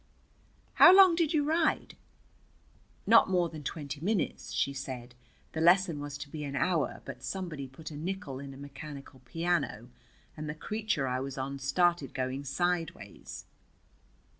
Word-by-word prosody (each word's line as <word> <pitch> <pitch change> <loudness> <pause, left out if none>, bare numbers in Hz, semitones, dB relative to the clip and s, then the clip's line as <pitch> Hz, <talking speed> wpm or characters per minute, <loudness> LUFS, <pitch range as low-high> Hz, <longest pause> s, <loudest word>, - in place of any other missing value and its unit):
"How 365 - +11
long 380 -3 +9
did 330 -2 +1
you 305 -3 +2
ride?" 320 +1 +1 1.1
"Not 225 -2 +6
more 180 -2 +2
than 155 -2 -8
twenty 145 0 -5
minutes," 200 +2 -1
she 140 - 0
said. 130 -3 -6 0.4
"The 160 - -3
lesson 175 -2 +4
was 145 0 -5
to 145 - -8
be 155 -1 -5
an 140 -1 -4
hour, 155 0 0
but 130 -3 -8
somebody 155 -2 -4
put 155 +5 -10
a - - -7
nickel 160 -4 -4
in 140 0 -8
a 135 - -11
mechanical 140 -1 -9
piano, 165 -9 -1 0.5
and 155 -1 -5
the 150 - -4
creature 210 -5 -2
I 125 0 -1
was 135 0 -5
on 135 +1 -4
started 150 +1 +1
going 130 +2 -2
sideways." 165 - -3
150 Hz, 155 wpm, -30 LUFS, 135-180 Hz, 1.1 s, How